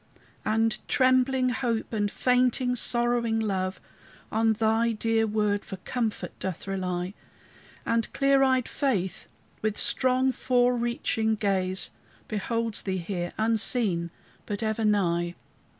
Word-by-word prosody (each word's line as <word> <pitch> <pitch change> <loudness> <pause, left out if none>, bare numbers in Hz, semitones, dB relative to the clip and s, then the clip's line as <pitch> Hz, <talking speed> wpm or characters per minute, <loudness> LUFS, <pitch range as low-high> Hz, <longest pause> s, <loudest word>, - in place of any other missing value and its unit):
And 225 0 +1
trembling 255 0 +3
Hope, 240 -3 -2
and 205 -2 0
fainting, 250 +1 +2
sorrowing 240 -2 +2
Love, 190 -3 -1 0.5
On 225 0 +3
thy 225 +2 +1
dear 225 0 +1
word 210 -1 0
for 190 - -7
comfort 225 +3 -3
doth 190 -3 -4
rely; 185 -1 -3 0.7
And 230 -1 0
clear 275 0 +3
eyed 260 -2 +3
Faith, 205 -11 -1 0.3
with 215 -1 -1
strong 255 +1 +2
forereaching 240 -3 +1
gaze, 190 -3 +1 0.4
Beholds 225 +1 -2
thee 190 -1 -2
here, 175 0 -3
unseen, 220 -5 +1 0.4
but 205 +1 -3
ever 220 +1 -1
nigh. 175 -5 +1
220 Hz, 115 wpm, -27 LUFS, 200-245 Hz, 0.7 s, trembling